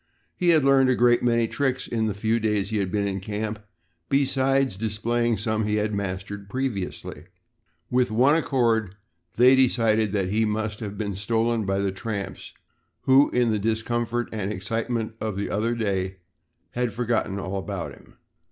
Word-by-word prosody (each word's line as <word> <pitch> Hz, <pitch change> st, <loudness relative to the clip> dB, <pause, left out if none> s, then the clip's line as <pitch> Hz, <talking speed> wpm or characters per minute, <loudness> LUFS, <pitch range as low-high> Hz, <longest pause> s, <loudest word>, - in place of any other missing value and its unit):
He 180 Hz, -, +1 dB
had 155 Hz, -4 st, +5 dB
learned 135 Hz, -1 st, +5 dB
a 130 Hz, -, +3 dB
great 120 Hz, 0 st, +4 dB
many 115 Hz, -1 st, +2 dB
tricks 130 Hz, +1 st, -1 dB
in 110 Hz, -2 st, -1 dB
the 105 Hz, -, -2 dB
few 110 Hz, +3 st, 0 dB
days 105 Hz, -2 st, 0 dB
he 110 Hz, -, 0 dB
had 95 Hz, -2 st, -1 dB
been 100 Hz, 0 st, 0 dB
in 95 Hz, -1 st, -2 dB
camp 105 Hz, +2 st, -4 dB, 0.5 s
besides 135 Hz, -2 st, +2 dB
displaying 115 Hz, +3 st, 0 dB
some 110 Hz, +1 st, -1 dB
he 105 Hz, 0 st, 0 dB
had 105 Hz, 0 st, 0 dB
mastered 100 Hz, 0 st, -4 dB
previously. 125 Hz, -7 st, -4 dB, 0.7 s
With 125 Hz, 0 st, +2 dB
one 125 Hz, +7 st, +4 dB
accord 115 Hz, -, +1 dB, 0.4 s
they 125 Hz, +3 st, +7 dB
decided 115 Hz, -5 st, +3 dB
that 95 Hz, -3 st, 0 dB
he 110 Hz, +3 st, +1 dB
must 110 Hz, 0 st, -2 dB
have 105 Hz, -2 st, -6 dB
been 100 Hz, -3 st, -3 dB
stolen 115 Hz, +2 st, 0 dB
by 95 Hz, 0 st, +1 dB
the 100 Hz, -1 st, 0 dB
tramps, 100 Hz, 0 st, -5 dB, 0.5 s
who, 135 Hz, +2 st, +5 dB
in 120 Hz, -2 st, +2 dB
the 105 Hz, -, 0 dB
discomfort 115 Hz, +2 st, -1 dB
and 105 Hz, -2 st, -3 dB
excitement 115 Hz, +3 st, -2 dB
of 110 Hz, -3 st, -2 dB
the 100 Hz, +1 st, -3 dB
other 115 Hz, +3 st, 0 dB
day, 95 Hz, -4 st, -2 dB, 0.5 s
had 120 Hz, -3 st, -1 dB
forgotten 115 Hz, -4 st, -1 dB
all 95 Hz, 0 st, -4 dB
about 95 Hz, -2 st, -4 dB
him. -, -, -18 dB
110 Hz, 170 wpm, -25 LUFS, 100-120 Hz, 0.7 s, they